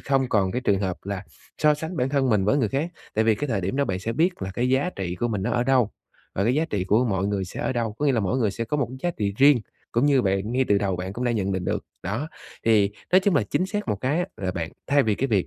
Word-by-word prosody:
không 135 -2 +1
còn 95 -5 +2
cái 125 - -1
trường 100 -5 +1
hợp 95 -2 -1
là 100 0 -4 0.3
so 150 -1 +4
sánh 160 +3 -5
bản 125 +1 +1
thân 135 -2 +1
mình 100 -3 +3
với 120 +8 +3
người 115 -7 +2
khác, 150 - -1 0.2
tại 110 +1 +2
vì 110 -1 +4
cái 145 +7 -3
thời 110 -5 0
điểm 95 +8 -2
đó 140 - +2
bạn 95 -5 -2
sẽ 115 +5 -3
biết 165 - 0
là 95 - -3
cái 125 +1 0
giá 135 +7 +2
trị 90 -2 -3
của 120 - -1
mình 100 -4 -2
nó - - -1
ở 120 0 +1
đâu 125 -4 +3 0.4
và 100 - 0
cái 120 +3 +2
giá 155 - +2
trị 95 -3 -1
của 110 +6 +3
mọi 95 -4 0
người 100 -2 -1
sẽ 90 - -7
ở - - 0
đâu, 115 -3 -1
có 150 - +1
nghĩa 140 - +4
là 115 - +1
mỗi 100 +7 0
người 110 -5 +2
sẽ 115 +4 -4
có 135 +6 -2
một 140 -4 +1
cái 130 - -8
giá 175 - +1
trị 100 -2 -1
riêng, 140 -3 +6 0.3
cũng 120 +5 +3
như 140 -3 +4
bạn, 100 +3 0
ngay 130 +1 +2
từ 100 -1 +4
đầu 95 -3 -1
bạn 95 +2 -4
cũng 125 +4 -4
đã 120 - +2
nhận 100 -3 -1
định 95 -1 -2
được. - - -2 0.2
Đó, 110 - -3 0.4
thì 105 -3 +4 0.2
nói 185 - +7
chung 190 -2 +2
là 140 - +4
chính 185 - +1
xác 210 -3 -3
một 105 - +1
cái 140 +7 0
á, 175 - 0
là 95 -2 -2
bạn 85 -2 -4
thay 145 0 +4
vì 110 -3 +1
cái 135 - -1
việc 100 -5 +2
115 Hz, 320 wpm, -25 LUFS, 100-135 Hz, 0.4 s, nói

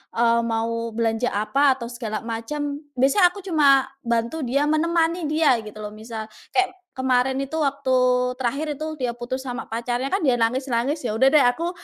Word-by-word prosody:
eee, 235 0 +3
mau 230 0 -1
belanja 230 +1 0
apa 265 +7 +2
atau 235 - -6
segala 220 -3 -5
macem, 285 +6 -4 0.2
biasanya 280 +8 +5
aku 380 +3 -10
cuma 280 -6 +4 0.2
bantu 235 +6 -1
dia, 280 +4 +1
menemani 330 +2 +1
dia, 300 -5 +3
gitu, 215 -1 -11
loh. 210 - -6
Misal 220 0 -7 0.3
kayak 380 0 +3 0.3
kemarin 260 0 +2
itu, 275 +3 -9
waktu 280 -2 -1 0.5
terakhir 275 +5 -1
itu 310 - -1
dia 250 -3 -1
putus 245 +2 -5
sama 245 -2 -5
pacarnya, 240 +3 -2
kan 390 +2 -1
dia 250 -3 +3
nangis-nangis. 260 +4 0
Ya - - 0
udah 245 +5 +4
deh, 295 -1 +5
aku 330 +8 +1
260 Hz, 170 wpm, -23 LUFS, 230-290 Hz, 0.5 s, biasanya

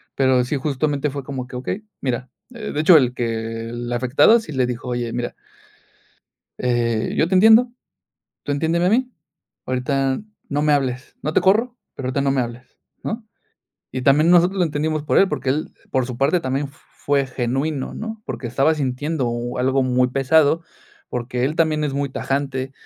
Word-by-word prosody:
Pero 130 -2 +3
sí, 135 +4 -2
justamente 145 +1 -1
fue 140 0 -5
como 130 -1 -5
que, 125 - -10
okey, 135 +11 -4 0.2
mira, 125 -1 -2 0.2
eh, 220 -3 -6
de 145 - -2
hecho, 165 +1 +8
el 125 -4 +2
que 115 -1 -3
el 120 +1 -5
afectado 130 - +4
sí 220 - -9
le 130 -3 +1
dijo, 125 0 -5
oye, 120 -1 -2
mira. 120 0 -3 1.3
"Eh, 120 -3 0
yo 160 - +3
te 190 - +2
entiendo, 220 +5 +6 0.7
tú 145 - -1
entiéndeme 165 +4 +1
a - - +3
mí, 250 +3 +1 0.5
ahorita 135 +1 0 0.3
no 145 +1 0
me 150 0 +3
hables, 130 -2 -1
no 155 - -2
te - - +5
corro, 225 +7 +3 0.2
pero 130 - -4
ahorita 140 +2 0
no 140 - +1
me 135 - +1
hables", 120 +1 -9 0.3
¿no? 220 0 -4 0.7
Y 130 - -3
también 150 +5 +5
nosotros 180 +2 +4
lo 180 - +4
entendimos 155 0 -1
por 150 - +1
él, 195 - +4
porque 135 -3 -2
él, 150 +4 -1 0.2
por 130 -2 +1
su 125 -2 -6
parte, 140 +7 +2
también 135 0 -1
f 140 - -19 0.3
fue 140 -1 +2
genuino, 130 +3 -2
¿no? 220 0 -6
Porque 125 - -5
estaba 135 +6 +2
sintiendo 140 0 -1
u 120 +1 -4
algo 130 +1 +2
muy 125 0 +2
pesado, 145 +4 +3 0.5
porque 125 0 -3
él 150 +4 -1
también 155 -2 +2
es 145 -2 -1
muy 140 0 -1
tajante, 135 -1 -2
135 Hz, 185 wpm, -21 LUFS, 125-155 Hz, 1.3 s, hecho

